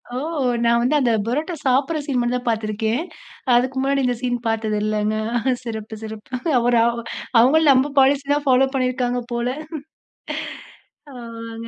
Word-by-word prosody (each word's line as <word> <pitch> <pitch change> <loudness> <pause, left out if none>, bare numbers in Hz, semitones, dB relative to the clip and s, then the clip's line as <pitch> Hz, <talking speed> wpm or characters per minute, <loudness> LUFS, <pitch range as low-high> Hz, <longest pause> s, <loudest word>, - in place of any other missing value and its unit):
ஓ! - - -2 0.5
நான் 235 0 +4
வந்து 255 +5 +2
அந்த 245 -3 +2
பரோட்டா 300 +9 -2
சாப்டற 270 +5 +2
சீன் 270 -4 0
மட்டும் 240 +1 0
தான் 245 - -9
பார்த்திருக்கேன். 220 +4 -1 0.5
அதுக்கு 255 +2 +1
முன்னாடி 275 0 +1
இந்த 245 - +1
சீன் 245 -1 -1
பார்த்தது 220 -1 0
இல்லங்க. 215 0 0 0.5
சிறப்பு, 220 -2 -6
சிறப்பு. 220 +2 -9 0.3
அவரு 240 0 +3
அவ் 235 0 0 0.4
அவங்களும் 290 +5 +5
நம்ம 265 +2 +2
பாலிசி 275 +1 +4
தான் 290 -1 -2
பாலோ 260 +1 +5
பண்ணியிருக்காங்க 250 -1 0
போல. 235 +1 -1 1.7
ஆமாங்க. 230 -1 -8
245 Hz, 145 wpm, -21 LUFS, 230-265 Hz, 1.7 s, அவங்களும்